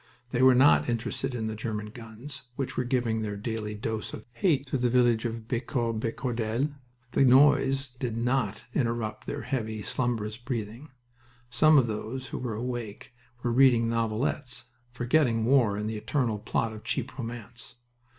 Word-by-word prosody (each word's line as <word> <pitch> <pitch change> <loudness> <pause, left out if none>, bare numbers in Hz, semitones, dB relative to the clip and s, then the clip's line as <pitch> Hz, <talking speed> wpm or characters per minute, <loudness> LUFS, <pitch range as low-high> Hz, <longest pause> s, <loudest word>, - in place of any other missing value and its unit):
They 125 - +1
were 130 -1 +7
not 135 0 +5
interested 125 +2 -2
in 110 -2 -2
the 110 - -2
German 105 -1 -4
guns, 120 +4 -10
which 135 -1 -3
were 125 - 0
giving 120 -3 0
their 105 -1 -3
daily 105 0 -3
dose 110 0 -4
of 110 - -8
"hate" 140 +2 +1
to 135 - 0
the 120 0 +2
village 120 -2 +3
of 115 -1 -4
Becourt 120 -2 -1
Becordel. 120 +3 -1 0.4
The 130 - +3
noise 135 0 +5
did 115 -3 -2
not 120 -3 0
interrupt 115 -4 -1
their - - -4
heavy, 110 -5 -3
slumbrous 110 -3 -1
breathing. 120 +2 -5 0.6
Some 155 +5 +6
of 130 - +5
those 115 +4 -4
who - - -4
were 120 -4 -3
awake 120 -1 -5 0.3
were 120 - +1
reading 120 -3 +5
novelettes, 115 +3 -1 0.3
forgetting 120 -2 +2
war 120 -6 +4
in 105 - -2
the 110 0 -3
eternal 110 0 -1
plot 110 +2 -1
of 110 - -10
cheap 130 -1 -3
romance. 120 0 -7
120 Hz, 160 wpm, -28 LUFS, 110-130 Hz, 0.6 s, were